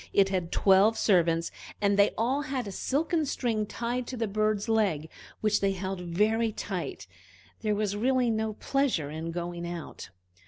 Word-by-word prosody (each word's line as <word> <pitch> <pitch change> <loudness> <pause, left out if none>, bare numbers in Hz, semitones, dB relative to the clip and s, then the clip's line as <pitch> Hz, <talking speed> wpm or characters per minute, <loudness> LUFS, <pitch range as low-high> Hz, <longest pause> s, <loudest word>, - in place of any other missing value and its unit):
It 195 -1 +4
had 180 -3 -2
twelve 200 +3 +4
servants, 170 -4 +2 0.3
and 200 -1 +2
they 200 0 +5
all 255 +6 +1
had 265 -4 -3
a 200 - -5
silken 310 - 0
string 230 -6 -1
tied 240 +2 -3
to 255 - -5
the 225 -1 -1
bird's 215 +1 0
leg 195 -9 +1 0.3
which 215 -1 +2
they 195 -1 +2
held 190 0 -4
very 215 +6 +1
tight. - - -5 0.5
There 215 -2 0
was 205 -1 -1
really 250 +2 +2
no 220 0 -1
pleasure 235 - 0
in 160 +2 -4
going 175 0 -4
out. 170 -2 -7
210 Hz, 165 wpm, -28 LUFS, 180-230 Hz, 0.5 s, they